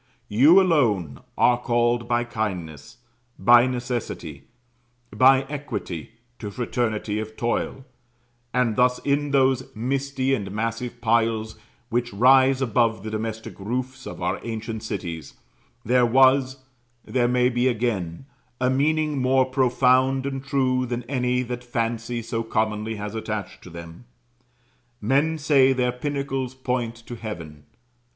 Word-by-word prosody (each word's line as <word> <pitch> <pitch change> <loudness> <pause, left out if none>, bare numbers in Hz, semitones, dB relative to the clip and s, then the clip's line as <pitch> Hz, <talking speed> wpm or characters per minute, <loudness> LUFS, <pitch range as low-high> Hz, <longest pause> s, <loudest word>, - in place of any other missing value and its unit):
You 140 - +6
alone 115 - +1 0.2
are 120 -1 +4
called 120 0 +1
by 120 0 +1
kindness, 95 - -5 0.4
by 120 +1 +6
necessity, 125 -2 -4 0.7
by 130 +1 +6
equity, 135 - -6 0.3
to 105 - -5
fraternity 110 -2 -2
of 110 0 -7
toil; 120 +2 -2 0.7
and 125 -3 +1
thus, 125 0 +3
in 145 +1 +1
those 130 -2 +2
misty 135 +3 -1
and 100 -7 -2
massive 115 +3 -4
piles 110 -1 +1 0.3
which 120 +1 -1
rise 130 +4 +5
above 115 -3 +1
the 110 - -5
domestic 110 0 -5
roofs 125 +5 -4
of - - -7
our - - -1
ancient 110 -1 -5
cities, 85 -9 -6 0.5
there 125 +1 +3
was 130 +2 +4 0.5
there 125 -2 +1
may 125 0 +3
be 125 +1 +1
again 110 -5 -2 0.3
a 130 0 +2
meaning 150 +1 +1
more 130 +1 +3
profound 130 +1 +2
and 135 -1 -4
true 130 -2 0
than 120 0 -3
any 125 0 0
that 125 0 -5
fancy 115 0 -3
so 115 0 -3
commonly 110 -1 -1
has 105 0 -6
attached 110 -4 -5
to - - -12
them. 85 +4 -11 0.9
Men 140 +8 +1
say 140 -3 +4
their 125 -1 +1
pinnacles 135 -1 -3
point 125 -3 -2
to 120 - -7
heaven. 85 -10 -8
120 Hz, 130 wpm, -24 LUFS, 110-130 Hz, 0.9 s, You